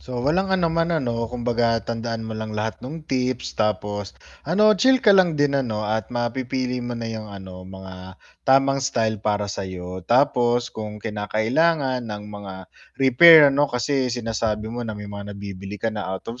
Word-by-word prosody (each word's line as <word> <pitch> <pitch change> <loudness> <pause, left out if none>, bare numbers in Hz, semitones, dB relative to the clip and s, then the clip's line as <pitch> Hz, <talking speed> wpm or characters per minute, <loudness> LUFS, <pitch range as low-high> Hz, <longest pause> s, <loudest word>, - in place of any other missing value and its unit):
So, 125 -1 -6
walang 185 +7 +1
anuman 165 -3 +1
ano 115 -3 -2
kumbaga 120 -1 0
tandaan 115 -1 -4
mo 110 - -5
lang 110 0 -5
lahat 110 +1 -3
nung 155 +6 -8
tips 130 -3 -2
tapos 105 -1 -2 0.3
ano, 210 +7 +5
chill 260 +6 +4
ka 205 - +7
lang 180 -5 +4
din 145 -1 +2
ano 115 -6 -1
at 110 -1 -1
mapipili 125 +1 -2
mo 120 0 -4
na 115 0 -4
yung, 110 -1 -6
ano, 95 -2 -9
mga 95 0 -10 0.3
tamang 135 +1 +4
style 115 -5 -1
para 105 -1 0
sayo. 95 -2 -6
Tapos 120 +1 +2
kung 105 -1 -6
kinakailangan 120 +7 0
ng 105 -1 -5
mga 105 -2 -8 0.5
repair, 135 +5 +8
ano, 145 +1 +2
kasi 130 +2 0
sinasabi 110 -2 -2
mo 120 - -4
nang 110 -2 -5
may 105 - -7
mga 100 0 -7
nabibili 100 0 -7
ka 115 +1 -2
na 105 - -4
out 95 0 -5
of 115 +2 -7
115 Hz, 170 wpm, -23 LUFS, 105-130 Hz, 0.5 s, repair